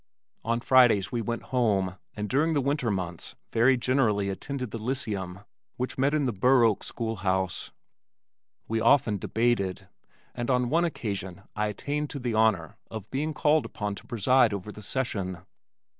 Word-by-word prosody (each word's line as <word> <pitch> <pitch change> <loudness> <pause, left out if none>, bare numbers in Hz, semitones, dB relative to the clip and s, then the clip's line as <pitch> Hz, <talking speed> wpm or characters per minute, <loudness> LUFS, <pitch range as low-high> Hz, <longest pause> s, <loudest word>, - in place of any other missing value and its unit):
On 115 +1 0
Fridays 120 -8 +5
we 120 - -1
went 115 +1 -3
home 100 -7 +2 0.2
and 105 0 -3
during 155 +7 +2
the - - +3
winter 140 -2 0
months 90 -4 -4 0.2
very 125 +3 +4
generally 115 -6 +1
attended 125 +4 -4
the 115 - -5
Lyceum 105 -7 -2 0.4
which 125 +1 -2
met 140 +3 +2
in 150 -2 +1
the 125 - 0
Burr 125 +5 +4
Oak 110 -3 +2
school 115 -2 -4
house. 95 -1 -1 1.0
We 110 0 -1
often 115 -4 +4
debated, 110 -3 0 0.4
and 120 0 -4
on 125 -1 +2
one 170 +2 +3
occasion 100 - -4
I 105 0 0
attained 145 +8 -3
to 140 - -5
the 120 -2 -2
honor 110 -8 +2
of 110 -2 -8
being 150 +3 -2
called 150 0 +3
upon 105 -1 -4
to 100 - -11
preside 120 0 +3
over 100 +1 -5
the 105 - -11
session. 100 -6 -3
115 Hz, 165 wpm, -27 LUFS, 100-130 Hz, 1.0 s, Fridays